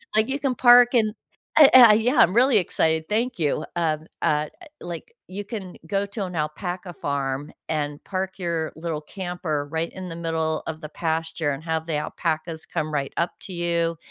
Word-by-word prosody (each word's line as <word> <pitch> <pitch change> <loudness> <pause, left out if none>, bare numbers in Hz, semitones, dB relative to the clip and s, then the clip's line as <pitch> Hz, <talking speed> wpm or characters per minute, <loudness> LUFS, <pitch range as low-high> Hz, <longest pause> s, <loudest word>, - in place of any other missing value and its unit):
Like 220 +1 +3
you 275 +2 -1
can 270 -3 0
park 245 0 +7
and 215 -3 +3 0.4
uh, 295 -3 +10
uh, 240 -4 +10
yeah, 230 +6 +2
I'm 180 - +6
really 250 -1 +5
excited. 160 -3 +1
Thank 235 +3 0
you. 150 -3 +1 0.2
Um, 160 -2 -1 0.2
uh, 150 0 +2
uh, - - -11 0.2
like 175 - -7
you 200 +2 -6
can 200 -4 -7
go 200 +3 0
to 200 0 -4
an 180 -2 -7
alpaca 175 +4 -4
farm 140 -1 -3 0.2
and 145 -2 -2
park 190 0 -4
your 170 -3 -2
little 160 -1 -4
camper 175 -4 -4
right 165 +1 -2
in 185 -1 -7
the 165 - -6
middle 160 -1 -1
of 160 0 -5
the 155 - -7
pasture 160 -1 -2
and 140 +3 -5
have 160 -1 -2
the 165 - -2
alpacas 160 +1 -3
come 155 0 -3
right 140 -2 -2
up 170 - 0
to 190 - -7
you 170 -1 0
170 Hz, 190 wpm, -24 LUFS, 155-200 Hz, 0.4 s, uh